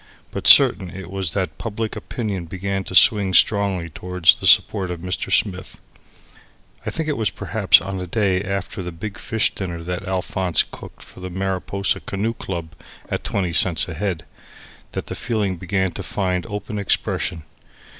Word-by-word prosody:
But - - -3
certain 95 - +7
it 95 0 -9
was 95 -4 -2
that 90 -5 -3
public 110 0 -4
opinion 105 -8 -4
began 95 +3 -3
to 95 - -6
swing 100 -3 +5
strongly 100 -5 +3
towards 90 0 +3
the - - -3
support 95 -2 +5
of 90 -1 -5
Mr. 90 +1 -3
Smith. 95 -3 0 1.1
I - - +1
think 160 -1 -3
it 150 - -1
was 110 -2 +1
perhaps - - +3
on 95 +1 -5
the 90 - -5
day 95 -1 +1
after 100 0 -4
the 90 -1 -5
big 100 +5 -7
fish 110 -2 +1
dinner 85 -4 -5
that 90 +2 -5
Alphonse 95 -2 +1
cooked - - -12
for - - -15
the 90 0 -6
Mariposa 95 +1 -1
Canoe 105 +4 -3
Club 85 -7 -6 0.4
(at - - -3
twenty 90 -4 -2
cents 85 -1 +2
a 85 - -6
head) 85 -1 -3 0.7
that - - -4
the - - -6
feeling 105 -6 -2
began 95 +1 -1
to 100 - -7
find 95 0 -2
open 105 0 -5
expression. 90 -3 -1
95 Hz, 170 wpm, -21 LUFS, 90-100 Hz, 1.1 s, certain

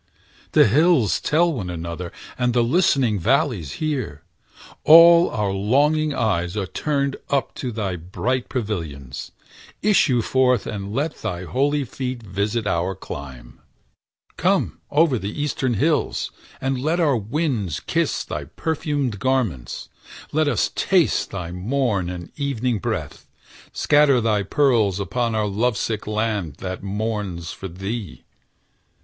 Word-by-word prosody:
The - - +7
hills 140 - +3
tell 170 +2 +2
one 100 -10 -4
another, 85 0 -5 0.2
and 125 -1 0
the 120 - +4
listening 130 - +2
Valleys 115 - +1
hear; 130 - -3 0.6
all 170 +2 +8
our 105 -2 -1
longing 145 +10 +2
eyes 100 -8 -1
are 100 - 0
turned 140 +6 -1
Up 140 -1 0
to 125 - -3
thy 100 -5 -3
bright 120 +9 -2
pavilions: 80 - -4 0.5
issue 150 - +3
forth 125 -3 +2
And 100 -1 -5
let 145 +7 -2
thy 90 -5 -3
holy 140 +8 0
feet 125 -1 -5
visit 105 +3 -2
our 90 0 0
clime! 65 -8 -9 0.8
Come - - +1
o'er 145 -5 +3
the 100 +9 -5
eastern 135 -4 0
hills, 150 +8 0 0.3
and 135 -1 -1
let 160 +5 0
our 150 -6 +3
winds 115 - -1
Kiss - - -1
thy - - -5
perfumed 145 -8 -2
garments; 115 - -1 0.4
let 155 0 +2
us 145 - +1
taste 180 -5 +2
Thy 90 -3 -5
morn 100 -1 -1
and 90 -1 -7
evening 125 -5 -1
breath; - - -4 0.4
scatter 145 -3 +4
thy 110 -3 +1
pearls 110 -3 +2
Upon 115 +3 -1
our 110 -1 +1
lovesick 110 +1 -1
land 105 -8 -1
that 95 +2 -5
mourns 100 -4 -3
for 95 - -7
thee. 95 - -6
115 Hz, 130 wpm, -22 LUFS, 95-140 Hz, 0.8 s, all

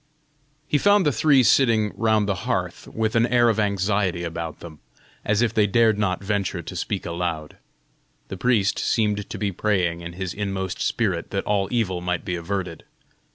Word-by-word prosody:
He 150 - +1
found 205 0 +4
the 145 - +3
three 135 +2 +4
sitting 115 -3 +3
round 110 -2 +2
the 100 - +1 0.2
hearth, - - -2
with 110 0 -2
an 115 +1 +4
air 120 -1 +4
of 110 -1 0
anxiety 100 -3 0
about 85 -1 -5
them, 80 -3 -11 0.4
as 105 +3 +1
if 120 - 0
they 105 -1 +3
dared 110 0 +3
not 100 -2 -1
venture 100 -4 -2
to 90 - -8
speak 95 +2 -3
aloud. 85 -3 -4 0.7
The 95 - -5
priest 105 -2 +1
seemed 105 -2 0
to - - -5
be 100 -2 -1
praying 90 -3 0
in 85 0 -7
his 95 0 -4
inmost 95 -2 -3
spirit 95 -8 -1
that 100 - -2
all 100 -2 +1
evil 100 -7 -1
might 90 -1 -2
be 90 - -3
averted. 90 -1 -4
100 Hz, 180 wpm, -23 LUFS, 90-110 Hz, 0.7 s, found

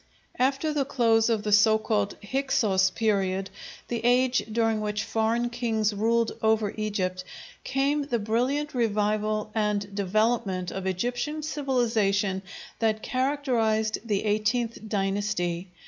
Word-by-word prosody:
After 270 +4 +1
the 290 -2 +1
close 230 -4 +2
of 220 -2 0
the 210 - -2
so 215 +1 +6
called 210 -2 -1
Hyksos 205 -6 +1
period, 195 -2 0 0.4
the 235 -1 -3
age 250 +1 +3
during 225 -1 +1
which 210 0 -2
foreign 230 +2 0
kings 225 -3 0
ruled 230 +2 +1
over 220 -2 +2
Egypt, 190 -4 -2 0.4
came 275 +3 0
the 245 -4 0
brilliant 250 +7 -1
revival 215 -2 0
and 210 -2 -1
development 200 -2 0
of 190 0 -4
Egyptian 245 - -2
civilization 225 -10 0 0.4
that 220 -1 0
characterized 245 -5 0
the 210 -4 0
XVIII 220 +3 +1 0.2
dynasty. 195 -3 -1
220 Hz, 120 wpm, -26 LUFS, 205-240 Hz, 0.4 s, so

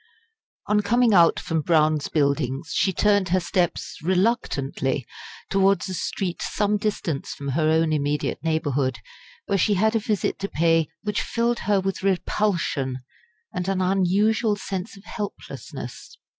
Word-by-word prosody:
On 210 0 +2
coming 230 +2 +3
out 170 -3 +5
from 160 -1 -1
Brown's 155 -2 +2
Buildings, 140 0 0
she 190 - +2
turned 205 0 +2
her 185 +2 +3
steps 175 0 -1
reluctantly 160 - 0 0.5
towards 195 -1 +3
a - - -3
street 180 0 -3
some 210 0 0
distance 190 -8 -3
from 140 -1 -5
her 155 +3 +1
own 160 0 +2
immediate 145 0 -1
neighbourhood, 145 -5 0 0.5
where 200 -1 0
she 205 +3 +3
had 220 +4 +2
a - - +3
visit 210 -4 -1
to 200 0 -3
pay 165 0 +2 0.2
which 210 -1 -1
filled 235 0 0
her 205 -1 +4
with 190 0 -2
repulsion 175 -9 0 0.5
and 180 0 -3
an 195 -1 0
unusual 195 +4 +2
sense 195 +1 -5
of 195 - -15
helplessness. 165 - -7
185 Hz, 145 wpm, -24 LUFS, 155-205 Hz, 0.5 s, out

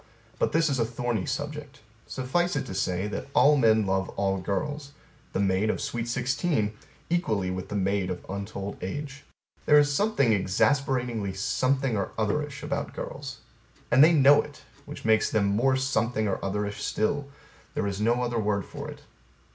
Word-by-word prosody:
But - - +1
this 165 +1 +3
is 135 -4 0
a - - +4
thorny 115 -3 -2
subject. 145 -1 -5 0.3
Suffice 175 +8 -1
it 135 - -1
to 110 - -6
say 95 +1 -1
that - - -5
all 150 +1 +6
men 110 -5 +4
love 95 0 0
all 95 -1 +1
girls 145 - -3 0.4
the - - -2
maid 100 +2 +2
of - - 0
sweet 120 -1 -3
sixteen 125 -2 0 0.4
equally 110 - 0
with 90 0 -5
the 105 - -4
maid 100 -1 0
of 90 -1 -5
untold 100 0 -5
age. 140 +7 -5 0.4
There 150 - +7
is 145 -1 +4
something 140 - +2
exasperatingly 115 +1 +1
something 130 +5 0
or 100 - -3
otherish 140 +6 -1
about - - -3
girls. - - -6 0.5
And 130 +4 +7
they 160 - +7
know 145 -2 +6
it 145 - -12 0.2
which - - -9
makes 110 -1 +3
them 105 -2 +1
more 120 +7 +2
something 120 -4 0
or 100 - -1
otherish 105 +1 -2
still: 140 +6 -1 0.5
there 110 - 0
is 100 0 -3
no 120 +3 +2
other 120 -1 -1
word 105 -3 0
for - - -7
it. - - -10
115 Hz, 170 wpm, -27 LUFS, 100-140 Hz, 0.5 s, There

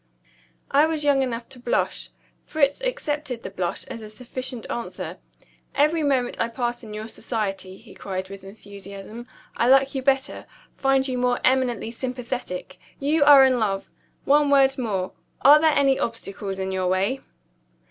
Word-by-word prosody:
I 290 +3 +5
was 315 -2 -1
young 285 -2 +3
enough 235 -2 -3
to 260 - -13
blush. 245 0 -1 0.3
Fritz 285 - 0
accepted 300 - -3
the - - -6
blush 180 -1 -2
as 230 - -8
a 215 - -9
sufficient 250 +1 -6
answer. 235 - -5 0.6
"Every 305 +3 +3
moment 265 -4 0
I 230 - +2
pass 240 +1 -3
in 215 - -9
your 215 +1 -5
society," 195 -5 -4
he - - -15
cried 190 -1 -5
with 195 0 -10
enthusiasm, 200 +3 -10 0.3
"I 235 - +2
like 270 +1 +5
you 265 - -2
better 270 +1 0 0.3
find 270 0 +2
you 255 -1 -2
more 245 0 +1
eminently 255 -4 +1
sympathetic. 245 -7 -5 0.2
You 290 +2 +2
are 280 -2 +9
in 255 -2 +2
love. 195 -3 -1 0.3
One 290 +1 +4
word 270 -1 +5
more 195 -6 -2 0.3
are 295 +2 +8
there 315 -1 +4
any 275 -1 +3
obstacles 200 -4 -4
in 190 0 -3
your 185 -1 -1
way?" 195 +9 0
250 Hz, 160 wpm, -24 LUFS, 205-275 Hz, 0.6 s, are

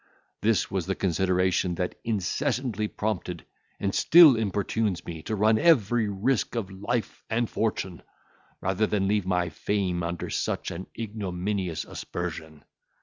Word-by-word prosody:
This 110 0 +2
was 95 -3 -2
the 95 - 0
consideration 90 0 +1
that 90 +1 -2
incessantly 115 +1 -1
prompted, 105 -6 -3 0.3
and 100 -1 -1
still 160 -6 +8
importunes 105 -2 -1
me 80 -2 -6
to 110 - -3
run 110 +2 +3
every 120 - +4
risk 110 +6 0
of 105 -5 -3
life 105 +5 -3
and 115 +1 +1
fortune, 95 -6 -2 0.6
rather 95 +3 +1
than 95 -2 0
leave 105 -2 +1
my 90 -2 +1
fame 90 +2 -1
under 85 0 -3
such - - -2
an 95 +3 -6
ignominious 100 -4 -3
aspersion. 80 -3 -6
100 Hz, 135 wpm, -27 LUFS, 90-110 Hz, 0.6 s, still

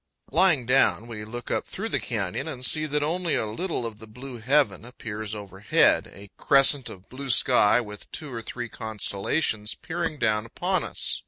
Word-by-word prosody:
Lying 170 -8 +4
down, 125 -2 +3
we 110 -3 -7
look 120 +2 -7
up - - 0
through 220 +4 -5
the - - 0
canyon 110 - -3
and 130 -5 -2
see 155 +3 +5
that 150 0 0
only 170 +2 0
a - - 0
little 125 - -3
of 110 -2 -6
the 110 - -12
blue 125 +3 -9
heaven 125 -4 +2
appears 110 -3 -6
overhead 100 0 +2
a 100 0 -13
crescent 135 -1 +4
of 95 0 -12
blue 135 +2 -6
sky, 120 -2 +5
with 105 -3 -8
two 145 -4 -6
or 115 - -4
three 120 +1 -5
constellations 110 +1 -2
peering 165 -3 -3
down 110 -3 +1
upon - - -1
us. - - 0
120 Hz, 180 wpm, -26 LUFS, 105-145 Hz, -, see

